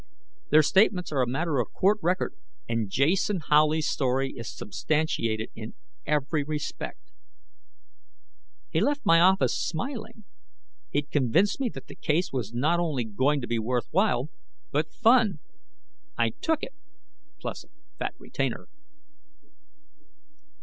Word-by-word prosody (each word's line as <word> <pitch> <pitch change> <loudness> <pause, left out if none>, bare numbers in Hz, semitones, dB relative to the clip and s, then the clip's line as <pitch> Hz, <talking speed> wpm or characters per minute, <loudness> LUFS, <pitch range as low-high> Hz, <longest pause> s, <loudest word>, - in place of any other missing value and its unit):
Their 155 +1 +6
statements 190 +1 +3
are 140 -3 +1
a 125 - +1
matter 150 +1 0
of 120 - -2
court 205 +3 +3
record, 180 +3 0 0.3
and 115 -3 -1
Jason 175 - +2
Howley's 155 +1 +4
story 135 0 0
is 115 - -6
substantiated 115 -3 -1
in 110 0 -8 0.3
every 150 0 +1
respect. 150 0 -5 1.6
He - - +1
left 290 0 0
my 165 0 +6
office 190 +3 +4
smiling. 220 - -4 0.7
He'd 145 0 -2
convinced 155 - +2
me 265 -3 0
that - - -8
the - - -11
case 160 +2 0
was 120 -5 -2
not 150 +9 +1
only 155 -8 0
going 130 +7 +1
to 120 - -5
be 120 -1 0
worthwhile, 125 - 0 0.4
but 150 +2 0
fun. 230 -5 +4 0.8
I 115 -1 +2
took 320 - -1
it, 265 - -5 0.7
plus - - -5
a - - -25 0.3
fat - - -3
retainer. - - -3
150 Hz, 130 wpm, -27 LUFS, 125-185 Hz, 1.6 s, Their